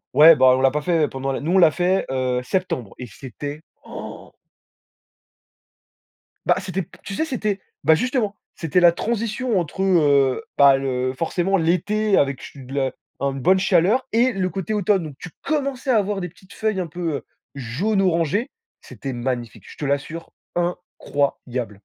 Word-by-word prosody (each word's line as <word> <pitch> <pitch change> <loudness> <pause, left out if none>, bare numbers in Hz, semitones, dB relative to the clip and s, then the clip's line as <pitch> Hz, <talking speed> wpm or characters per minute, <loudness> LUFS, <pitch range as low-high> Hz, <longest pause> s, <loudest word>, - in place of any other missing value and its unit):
Ouais, 160 +2 +9
bah, 130 -3 +6
on - - -1
l'a 135 0 +4
pas 150 - -1
fait 165 -2 +2
pendant 135 0 -4
la - - -2
nous, 155 +4 -2
on - - +5
l'a 170 - +7
fait, 180 +4 +1
heu, 130 -1 0
septembre 130 - -2
et 125 - -6
c'était, 145 +5 -8 0.2
oh! - - -9 2.2
Bah, - - +4
c'était 190 0 -3
p - - -16
tu 200 - -6
sais, 315 - 0
c'était 215 -9 -2 0.2
bah, 160 - +6
justement, 235 - -1 0.2
c'était 165 +2 +1
la 175 -1 +7
transition 230 +3 -1
entre, 175 +2 -3
heu, 145 -8 +3
bah, 140 -1 +7
le 130 -1 -1
forcément, 180 +4 0
l'été 195 +5 +1
avec 140 -1 +1
che - - -11
de 130 +1 -9
la 135 -2 0 0.3
un 140 0 0
bonne 135 +8 +3
chaleur 200 +8 +3
et 245 +3 +3
le 190 -4 -1
côté 195 +5 -3
automne. 200 -3 +2
Donc 150 -3 -8
tu 180 - -9
commençais 275 -3 -1
à 235 - +4
avoir 205 -1 0
des 180 - -4
petites 190 +3 -19
feuilles 215 -3 -1
un 180 - -2
peu 165 0 -3
heu - - -9 0.3
jaune-orangé, 175 - 0 0.3
c'était 135 -2 -7
magnifique, 120 -1 -4
je - - -12
te 150 - -5
l'assure. 145 +4 -3 0.2
incroyable. 140 -8 -2
170 Hz, 175 wpm, -22 LUFS, 140-195 Hz, 2.2 s, Ouais